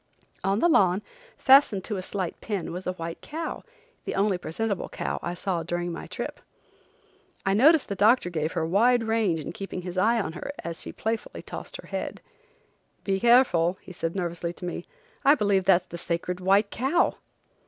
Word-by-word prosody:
On 195 +1 +2
the - - +5
lawn, 195 - +4 0.3
fastened 265 -8 +5
to 210 -1 -3
a - - -3
slight 185 -1 -4
pin, 200 -7 -3
was 180 +1 -6
a 185 - 0
white 165 -1 -6
cow, 320 +2 -5 0.4
the - - -3
only 200 0 +2
presentable 195 +4 -3
cow - - -3
I 175 +1 -3
saw 180 -2 -1
during 175 +1 -2
my 165 - -6
trip. - - -5 1.1
I 195 - +2
noticed 295 +8 +5
the - - -2
doctor 205 -1 +3
gave 155 -1 -2
her 160 - 0
wide 230 +8 +3
range 215 -9 0
keeping 185 -1 -6
his 180 0 -3
eye 230 +4 +3
on 175 -6 -3
her 230 - -5
as 170 -1 -5
she - - -6
playfully 225 +1 -4
tossed - - -7
her - - -12
head. - - -4 0.8
"Be 195 -1 0
careful," 230 -8 +4
he 185 - -12
said 165 0 -3
nervously 170 -2 -3
to 180 - -9
me. 175 - -5 0.4
"I 285 +2 +7
believe 200 -6 +2
that's 180 -1 +4
the 170 - -8
sacred 175 +1 -3
white 195 +3 +3
cow." 275 +9 +2
190 Hz, 185 wpm, -26 LUFS, 175-225 Hz, 1.1 s, I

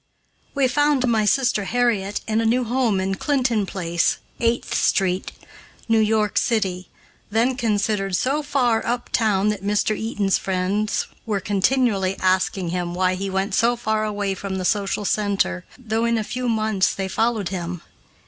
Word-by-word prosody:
We 275 -2 +3
found 290 +1 +2
my 220 -3 +2
sister 235 -3 +2
Harriet 220 -4 0
in 220 0 +1
a - - -1
new 250 +3 +2
home 235 -4 +1
in 190 +1 -1
Clinton 240 -3 0
Place 170 -3 0 0.2
(Eighth 235 +1 0
Street), 185 -1 +1 0.6
New 225 -1 +3
York 215 -1 +2
city, 190 -6 -1 0.4
then 230 +5 +1
considered 205 -4 0
so 275 +10 0
far 260 -6 +1
up 240 +1 -2
town 210 -2 +2
that 205 -2 -3
Mr. 210 +1 +1
Eaton's 210 -3 0
friends 195 +3 -1 0.2
were 210 -3 0
continually 200 -1 +1
asking 185 -1 +1
him 175 0 -3
why 185 0 +2
he 195 +1 -3
went 190 +1 -1
so 235 +4 +3
far 220 -2 -1
away 205 -2 -1
from 195 0 -5
the 185 - -3
social 205 +1 0
center, 195 - 0
though 225 -2 -1
in 235 0 +1
a 220 - -1
few 250 +3 -3
months 215 -4 +1
they 195 -1 -3
followed 220 -1 0
him. 175 -2 -4
210 Hz, 160 wpm, -22 LUFS, 190-235 Hz, 0.6 s, We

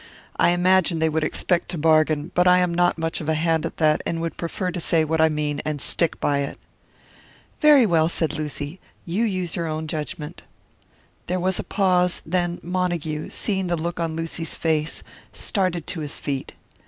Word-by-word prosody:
I - - +4
imagine 180 0 +3
they 160 0 +2
would 160 0 0
expect 170 +3 0
to 175 - -3
bargain, 155 0 +2
but 180 0 +3
I 180 0 +7
am 180 -1 +1
not 175 0 +2
much 165 0 -2
of 155 - -4
a 160 - +2
hand 165 0 +1
at - - -11
that, 155 -1 +3
and 165 - -2
would 165 -1 -3
prefer 180 +2 -3
to 175 - -4
say 165 -1 +2
what 160 +1 0
I 160 - +5
mean 150 -1 -2
and 150 -1 -3
stick 165 +3 0
by 145 -1 +1
it." 140 - -3 1.0
"Very 295 -5 +7
well!" 165 -4 +3
said 160 -3 0
Lucy, 150 +2 -5 0.3
"you 185 +7 0
use 185 -5 -2
your 170 -1 -2
own 155 0 -3
judgment." 150 -1 -5 0.9
There 180 +1 -1
was 185 +1 +2
a - - -2
pause; 180 -3 +1
then 175 +1 -1
Montague, 170 -4 -2
seeing 190 -3 -1
the 175 -1 0
look 170 +2 -4
on 165 -1 -2
Lucy's 165 0 -2
face, 155 -1 -1 0.3
started 185 -5 0
to 170 - -4
his 150 -2 -3
feet. 135 -2 -4
165 Hz, 190 wpm, -23 LUFS, 155-180 Hz, 1.0 s, I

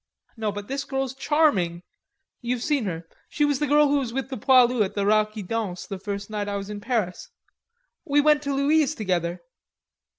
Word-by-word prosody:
"No, 220 -3 -2
but 205 0 -7
this 275 +1 -3
girl's 270 -2 -3
charming.... 265 - +1 0.6
You've 245 0 -2
seen 290 -6 0
her. 165 -3 -5 0.2
She's 290 -2 +1
the 295 - 0
girl 295 +1 +5
who 285 0 +2
was 250 -4 -3
with 265 +1 -3
the - - -2
poilu 250 -1 +4
at 190 - -5
the 200 -1 0
Rat 215 +1 +3
qui 215 -2 -6
Danse 195 -2 -3
the 195 - -6
first 200 0 -5
night 210 -1 -3
I 200 - -2
was 200 +1 -6
in 205 -1 -6
Paris. 220 -6 -2 0.7
We 290 -3 +2
went 300 0 +4
to 280 -1 -2
Louise 300 +2 +2
together." 175 -4 -2
230 Hz, 195 wpm, -25 LUFS, 200-280 Hz, 0.7 s, girl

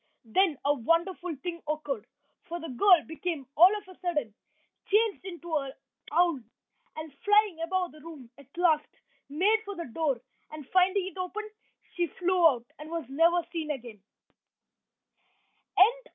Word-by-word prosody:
Then 315 - +2
a 290 - +4
wonderful 335 +6 0
thing 335 -2 -4
occurred, 295 -7 -3 0.4
for 345 +1 -4
the 330 - -7
girl 350 +7 +5
became 320 -3 -4
all 350 +4 +9
of 410 -2 -11
a 370 - -15
sudden 300 - -2 0.6
changed 425 0 +2
into 345 -3 -5
an 275 -2 -3 0.4
owl, 340 -2 +3 0.6
and 315 -2 -7
flying 415 -4 +4
about 365 +1 -1
the 305 - -15
room, 295 -6 -11
at 280 - -15
last, 320 -4 +3 0.4
made 395 +10 +2
for 405 -2 -6
the 340 -1 -5
door, 275 0 -1 0.3
and, 305 -3 -9
finding 370 +1 +3
it 380 - -9
open, 420 +4 -4 0.5
she 350 -1 +1
flew 360 0 +3
out 245 -6 0
and 305 +1 -9
was 330 -1 -4
never 335 +5 +3
seen 320 -3 -4
again. 235 -7 -7
335 Hz, 150 wpm, -29 LUFS, 295-365 Hz, 0.6 s, all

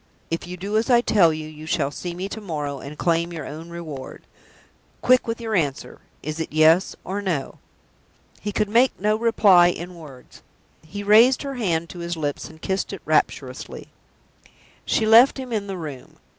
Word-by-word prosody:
If 165 +1 -3
you 180 0 -7
do 200 +4 -2
as 225 +4 0
I 240 -1 +5
tell 190 -8 +4
you, 155 0 -5
you 155 0 -11
shall 140 -3 0
see 175 +4 -6
me 185 +2 -4
to 220 - -7
morrow, 150 -7 -4
and 145 +3 -9
claim 170 0 0
your 160 -4 -6
own 160 +3 -8
reward. 155 -6 -8 0.8
Quick 255 -1 +4
with 230 +1 -3
your 225 -1 -4
answer! 145 -8 -2 0.2
Is 155 +2 -4
it 160 - -4
Yes 160 +4 +4
or 195 +3 -4
No?" 170 -9 -3 0.8
He 205 - -3
could 210 +1 0
make 235 +5 +3
no 210 +2 +2
reply 210 -6 +5
in 175 0 -4
words. 150 -7 -14 0.4
He 200 +6 -7
raised 225 +7 +5
her 275 -1 -4
hand 170 -9 -1
to 175 - -9
his 170 0 -4
lips, 145 -2 -3
and 160 0 -15
kissed 190 +3 -2
it - - -7
rapturously. - - -1 1.0
She 220 - +1
left 230 +6 +7
him 255 -3 -6
in 205 -2 -2
the 195 -1 -5
room. 150 -6 -8
175 Hz, 185 wpm, -23 LUFS, 155-215 Hz, 1.0 s, left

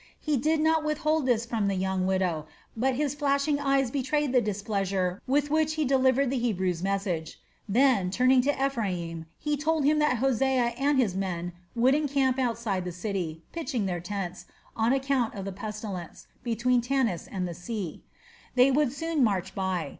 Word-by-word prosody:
He 305 -1 0
did 310 +5 +1
not 320 0 +3
withhold 305 -1 0
this 235 -2 +2
from 225 -3 -1
the 195 - 0
young 190 0 0
widow, 180 -5 0 0.3
but 255 +3 +1
his 290 0 0
flashing 285 0 +1
eyes 275 -3 +1
betrayed 285 +1 0
the 250 - +5
displeasure 195 -3 -1
with 290 +2 +1
which 315 0 +2
he 310 -1 0
delivered 265 0 +3
the 270 - 0
Hebrew's 185 -7 0
message. 190 -4 -2 0.3
Then, 235 -4 +3
turning 255 +5 +4
to 275 +1 +1
Ephraim, 175 -10 -3
he 295 -1 -1
told 305 0 0
him 300 +1 +4
that 300 -4 +2
Hosea 255 -1 +2
and 280 +3 +1
his 230 -8 +2
men 175 -2 -3 0.2
would 245 +3 +4
encamp 275 -3 +1
outside 230 -6 0
of 180 - -5
the 180 - -3
city, 175 -4 -4
pitching 265 -10 -2
their 175 -2 -2
tents, 180 -1 -5 0.3
on 225 +1 +2
account 270 -4 +1
of 195 -1 -5
the 195 - -3
pestilence, 200 -2 -6 0.2
between 240 +1 +1
Tanis 245 -7 0
and 185 -2 -2
the 175 - -5
sea. 180 0 -5 0.5
They 255 +2 +6
would 285 -1 +2
soon 315 0 0
march 190 -4 0
by. 185 -5 -2
240 Hz, 175 wpm, -27 LUFS, 190-275 Hz, 0.5 s, They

